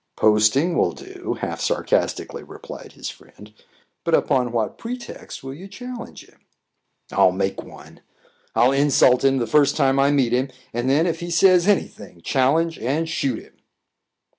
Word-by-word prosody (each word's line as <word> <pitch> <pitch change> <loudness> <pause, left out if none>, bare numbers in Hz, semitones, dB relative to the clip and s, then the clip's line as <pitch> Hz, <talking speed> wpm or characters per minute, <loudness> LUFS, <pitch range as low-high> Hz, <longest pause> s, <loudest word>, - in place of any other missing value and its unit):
"Posting 110 +11 +3
will 85 - +2
do," - - -7
half - - -4
sarcastically - - -1
replied - - -11
his - - -6
friend. 105 +1 -17 0.5
"But - - +3
upon 125 -2 +1
what 115 -2 -2
pretext 240 - -8
will 135 0 -6
you 180 +8 -10
challenge 245 +3 -9
him?" - - -25 0.7
"I'll 95 -2 +4
make 95 +1 -2
one. - - -14 0.5
I'll 125 +2 +4
insult 135 -2 +4
him 135 0 +3
the 120 - 0
first 140 +5 +3
time 135 -2 +3
I 140 +1 +4
meet 135 -5 +2
him 130 +2 +1 0.2
and 120 +2 -1
then, 150 +5 +3
if 165 -2 -1
he 175 0 -5
says 180 +1 +4
any 205 -2 +3
thing, 95 -5 -15
challenge 155 - +1
and 145 +7 -1
shoot 140 -7 -2
him." - - -21
135 Hz, 165 wpm, -22 LUFS, 120-165 Hz, 0.7 s, I'll